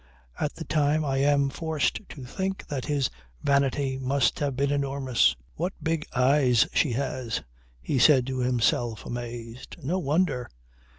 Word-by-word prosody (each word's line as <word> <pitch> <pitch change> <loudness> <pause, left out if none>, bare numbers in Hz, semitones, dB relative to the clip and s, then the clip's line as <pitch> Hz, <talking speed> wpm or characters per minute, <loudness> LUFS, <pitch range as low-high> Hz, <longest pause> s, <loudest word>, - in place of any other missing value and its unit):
At 150 - -1
the 165 - -7
time 150 0 +1
I 135 -1 0
am 140 0 +3
forced 155 -2 -1
to 135 -4 -9
think 190 +8 -3
that 135 -3 -3
his 145 -3 0 0.3
vanity 140 -1 +1
must 135 -1 +1
have 140 -3 -1
been 140 +2 +1
enormous. 140 -3 +2 0.2
"What 180 +4 -2
big 160 -1 -1
eyes 125 -2 +4
she 140 -7 +2
has," 130 -3 -2 0.4
he 130 - 0
said 130 -1 +6
to 130 0 -3
himself 120 -2 +1
amazed. 120 0 -7
No 175 +8 0
wonder. 150 -5 0
135 Hz, 150 wpm, -27 LUFS, 125-150 Hz, 0.4 s, said